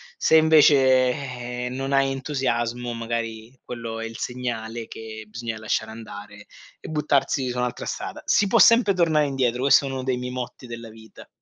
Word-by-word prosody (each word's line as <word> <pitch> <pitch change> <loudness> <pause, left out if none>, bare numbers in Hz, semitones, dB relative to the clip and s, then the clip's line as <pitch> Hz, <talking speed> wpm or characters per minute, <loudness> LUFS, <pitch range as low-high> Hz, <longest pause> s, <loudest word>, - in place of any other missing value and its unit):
Se 160 - +4
invece, 140 -5 +5
eh, 125 -2 -5
non 135 +2 -4
hai 135 0 +3
entusiasmo 125 -3 -2
magari 115 +1 -5
quello 115 -2 -6
è 115 - -4
il 115 0 -8
segnale 120 -2 -4
che 110 -1 -9
bisogna 115 0 -6
lasciare 110 0 -2
andare 105 -2 -10 0.3
e - - -10
buttarsi 140 -3 0
su 125 - -4
un'altra 125 0 -2
strada. - - -5
Si 205 - +2
può - - +3
sempre 230 -3 +6
tornare 160 -4 +2
indietro. 130 -3 -1
Questo 140 +1 +5
è - - -3
uno 130 -1 -4
dei 130 -1 0
miei 125 0 -5
motti 125 0 -6
della 115 -1 -8
vita. 110 0 -15
125 Hz, 175 wpm, -24 LUFS, 115-135 Hz, 0.3 s, sempre